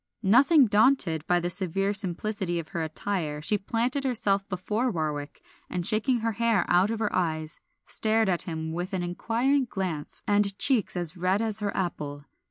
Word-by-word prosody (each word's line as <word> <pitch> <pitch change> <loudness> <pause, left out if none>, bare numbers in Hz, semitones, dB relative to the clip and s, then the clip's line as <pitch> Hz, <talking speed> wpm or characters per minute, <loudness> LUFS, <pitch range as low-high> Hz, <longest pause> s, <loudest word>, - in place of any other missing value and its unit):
Nothing 265 - +5
daunted 205 - +2
by 175 0 +3
the 175 +1 -2
severe 195 +2 0
simplicity 195 -2 -2
of 160 -2 -5
her 170 - -4
attire 160 -1 -3
she 205 +7 0
planted 235 +7 -1
herself 205 -6 0
before 210 +7 -1
Warwick, 150 -6 -4 0.3
and 180 -2 -3
shaking 230 +3 +2
her 230 0 0
hair 225 -3 +1
out 180 +3 +3
of 225 - -2
her 215 -1 -2
eyes 155 -3 -2 0.3
stared 220 0 +1
at 180 -3 +4
him 160 -2 -3
with 180 +4 -4
an 185 -2 -1
inquiring 235 +10 0
glance 185 -9 -5
and 205 -1 +1
cheeks 250 -9 +3
as 175 -1 0
red 185 +3 +1
as 220 -1 0
her 205 -1 -2
apple. 145 -6 -4
195 Hz, 175 wpm, -27 LUFS, 175-220 Hz, 0.3 s, Nothing